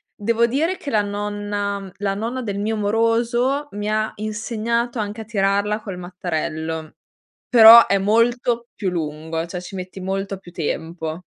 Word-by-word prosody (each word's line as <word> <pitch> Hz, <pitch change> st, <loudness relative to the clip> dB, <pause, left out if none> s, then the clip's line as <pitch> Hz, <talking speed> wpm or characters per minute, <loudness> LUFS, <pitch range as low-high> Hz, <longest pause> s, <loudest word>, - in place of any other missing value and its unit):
devo 230 Hz, +2 st, +2 dB
dire 310 Hz, +10 st, 0 dB
che 285 Hz, -, -6 dB
la 215 Hz, -6 st, +2 dB
nonna 205 Hz, -1 st, -3 dB
la 200 Hz, 0 st, -1 dB
nonna 230 Hz, +6 st, -3 dB
del 200 Hz, -3 st, -3 dB
mio 220 Hz, +2 st, -1 dB
moroso 235 Hz, +6 st, +1 dB
mi 205 Hz, +1 st, -4 dB
ha 215 Hz, 0 st, +1 dB
insegnato 230 Hz, +2 st, -2 dB
anche 210 Hz, +1 st, -4 dB
a 220 Hz, -, -6 dB
tirarla 205 Hz, 0 st, 0 dB
col 190 Hz, -4 st, -6 dB
mattarello, 160 Hz, -3 st, -4 dB, 0.5 s
però 230 Hz, -1 st, +10 dB
è 200 Hz, -, +3 dB
molto 235 Hz, +3 st, +1 dB
più 195 Hz, -, -2 dB
lungo 160 Hz, -1 st, -3 dB
cioè 180 Hz, +1 st, -5 dB
ci 185 Hz, +2 st, -9 dB
metti 185 Hz, +1 st, -7 dB
molto 195 Hz, +1 st, -3 dB
più 175 Hz, -2 st, -14 dB
tempo. 160 Hz, +1 st, -4 dB
205 Hz, 155 wpm, -21 LUFS, 185-230 Hz, 0.5 s, però